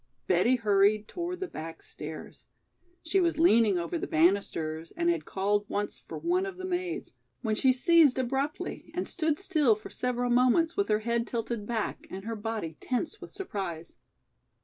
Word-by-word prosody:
Betty 185 +8 +4
hurried 210 -2 +3
toward 355 +1 -4
the 375 - -1
back 160 - -8
stairs. 155 +1 -9 0.6
She 360 +4 +2
was 340 -4 +1
leaning 230 - +5
over 170 0 -2
the - - -3
banisters 165 -2 +1
and 345 0 +3
had 340 -2 -2
called 205 +1 0
once 205 0 -2
for - - -8
one 365 +3 0
of 380 -2 -7
the 370 - -5
maids, 360 -1 -3 0.3
when 220 -2 +1
she 260 +4 +4
ceased 290 +1 +5
abruptly, 270 +6 -2
and 360 - -2
stood 315 -4 0
still 310 - +3
for 215 - -11
several 245 -1 -1
moments 255 +7 +4
with 400 - 0
her 210 0 +2
head 235 +1 0
tilted 230 -2 -3
back 225 -3 -3
and 195 +1 -7
her 230 0 -3
body 210 -7 -4
tense 285 - -3
with - - -9
surprise. 190 - -5
235 Hz, 170 wpm, -29 LUFS, 205-335 Hz, 0.6 s, leaning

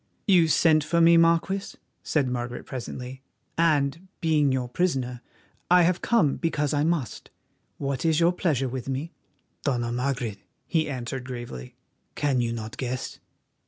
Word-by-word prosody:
"You 180 -5 +5
sent 155 -1 +4
for 170 +3 +1
me, 170 0 +7
Marquis," 170 +4 +2 0.3
said 145 -4 0
Margaret 120 0 -4
presently, 130 0 -7 0.3
"and, 160 +1 +1
being 155 -5 +2
your 130 -1 -1
prisoner, 125 -5 -1 0.5
I 180 0 +6
have 175 +1 +2
come 175 -12 +2
because 150 -4 -1
I 145 0 +2
must. 155 -8 -2 0.5
What 135 -2 -2
is 160 -1 +3
your 170 +1 +4
pleasure 150 -8 0
with 130 +1 -5
me?" 140 +6 -3 0.5
"Dona 120 -4 0
Margaret," 125 -4 -2 0.3
he 160 -3 0
answered 130 -1 -4
gravely, 120 - -7 0.4
"can 140 -4 +1
you 120 -1 -1
not 110 -1 -6
guess? 130 0 -4
140 Hz, 145 wpm, -26 LUFS, 125-165 Hz, 0.5 s, me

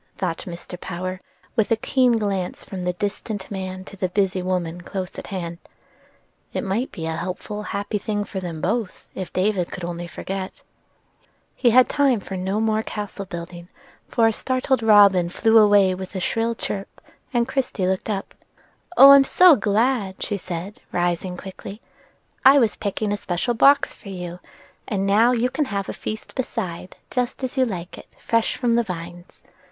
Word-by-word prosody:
thought 170 -3 -3
Mr. 175 0 -8
Power, 185 +1 -5 0.3
with 220 -4 +2
a 225 - +4
keen 250 +2 +2
glance 200 -5 -2
from 185 -2 -6
the 180 - 0
distant 205 +1 -4
man 185 -1 -5
to - - -11
the 185 -1 -2
busy 190 -1 0
woman 180 -2 -2
close 185 +1 -5
at - - -9
hand. 170 -4 -5 0.9
"It - - -2
might 215 +7 -1
be 165 - -6
a 160 0 -2
helpful, 185 +5 -5
happy 205 0 -3
thing 205 +1 -2
for 195 - -5
both, 195 +6 -2
if 190 -2 -6
poor 185 - 0
David 185 -3 -1
only 175 0 -4
could - - -15
forget." 190 -1 -5 0.9
He 245 - +3
had 250 +2 +6
time 275 -5 +2
for 195 0 -7
no 190 +3 -1
more 220 0 +1
castle 205 -2 -6
building, 175 -1 -8 0.4
for 230 - +2
a 225 - +3
startled 260 +2 0
robin 200 -5 +6
flew 225 +5 +4
away 205 -3 +5
with 190 +1 -7
a - - -1
shrill 230 +5 0
chirp, 195 -3 -5 0.3
and 240 -2 +1
Christie 265 -8 -1
looked 190 +3 -1
up. 195 -2 -3 0.6
"Oh, 275 +1 +11
I'm 280 0 +9
so 355 +4 +7
glad!" 210 -2 0
she 205 - -2
said, 185 +4 -6
rising 175 +1 -1
quickly. 195 +2 -9 0.6
"I 270 +2 +8
was 230 -6 +3
picking 205 0 -2
a - - -1
special 185 +6 -1
box 280 +5 +5
for 200 - -12
you, 180 -2 -6 0.5
and 195 -2 -1
now 215 +5 +4
you 250 +1 +1
can 300 +2 0
have 200 -6 -3
a - - -3
feast 215 0 -6
beside, 190 -9 -4
just 250 +1 -2
as 260 - -3
you 260 -1 +3
like 180 -4 -6
it, - - -14
fresh 230 -1 +1
from 240 -2 +1
the 235 - +4
vines. 175 -2 -8
200 Hz, 180 wpm, -23 LUFS, 185-225 Hz, 0.9 s, Oh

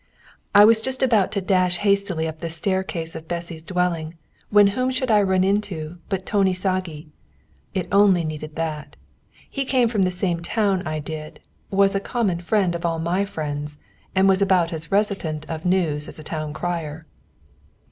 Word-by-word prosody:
I 205 +1 +10
was 220 0 +6
just 260 +2 -1
about 225 -7 +3
to 200 - -1
dash 185 -2 +2
hastily 200 -4 +1
up 160 0 -6
the 165 - -4
staircase 170 -1 -2
of 160 0 -8
Bessy's 170 -1 -5
dwelling, 170 -2 -1 0.3
when 205 0 +6
whom 255 +3 0
should 260 -2 -1
I 210 -1 +5
run 190 -2 +2
into 185 -5 -1
but 190 -2 -2
Tóni 195 -3 +2
Sági. 180 -5 -3 0.7
It 180 -2 -1
only 200 -3 +5
needed 155 -1 -6
that. 155 -2 -4 0.5
He 275 - -3
came 255 -2 +2
from 220 -3 0
the 185 - +3
same 180 -1 -1
town 200 +1 +1
as 180 - -6
I 155 0 -2
did, 155 +1 -7 0.3
was 195 0 +3
a 195 - +1
common 200 -5 -1
friend 185 0 +1
of 170 +1 -5
all 165 -1 0
my 175 +5 0
friends, 150 -4 -5 0.4
and 190 +1 +4
was 195 0 +4
about 185 -4 +3
as 160 0 -7
reticent 195 -7 0
of 160 0 -6
news 165 -5 +1
as - - -10
a 155 - -9
town 155 -1 -4
crier. 160 -1 -4
180 Hz, 180 wpm, -23 LUFS, 160-200 Hz, 0.7 s, I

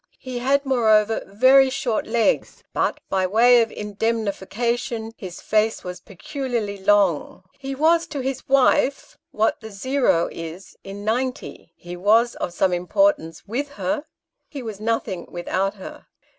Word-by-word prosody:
He 255 -2 -6
had, 275 +3 +1
moreover, 220 -4 +3
very 260 +7 +5
short 245 -4 -2
legs, 225 0 0
but, - - 0
by 190 -1 0
way 235 +5 +5
of 225 - -1
indemnification, 225 +2 -2
his 180 -3 -8
face 220 +1 +1
was 180 -1 -6
peculiarly 225 - -5
long. 195 -5 +2
He 270 0 -7
was 330 +4 +3
to 290 -4 -4
his 265 0 -4
wife 275 0 +2
what 220 +2 0
the 220 - -8 0.6
is 165 +3 -9
in 200 +1 -8
90 245 -6 -3
he 175 0 -9
was 220 +6 +3
of - - -3
some 180 +1 +1
importance 175 - +1
icith 255 +7 -2
her 295 +1 -2 0.4
he 280 -4 -7
was 215 -3 -6
nothing 215 -5 -2
without 190 +3 -2
her. 190 - -11
225 Hz, 140 wpm, -22 LUFS, 195-260 Hz, 0.6 s, very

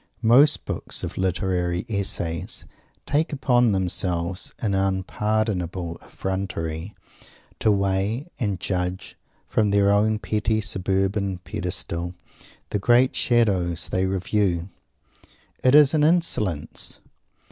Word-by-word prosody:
Most 135 +6 +5
books - - -4
of - - -4
critical 95 0 -1 0.4
essays 90 -6 -3 0.4
take 155 +4 +1
upon 125 -5 +3
themselves, 90 -1 -1
in 105 -4 -1
unpardonable 95 -2 -1
effrontery, 95 -2 -4 0.6
to 110 - +3
weigh 100 +6 0
and 100 -7 -1
judge, 90 -1 -3 0.3
from 105 -2 +2
their 100 0 +4
own 105 +2 +3
petty 110 +1 0
suburban 95 -1 0
pedestal, 90 -1 -3 0.6
the 105 - 0
great 120 +5 +4
Shadows 95 -8 +1
they 95 +1 +1
review. 95 -1 0 0.9
It 130 +2 +5
is 150 -1 +7
an 150 -2 +3
insolence! 150 - 0
100 Hz, 105 wpm, -24 LUFS, 90-110 Hz, 0.9 s, is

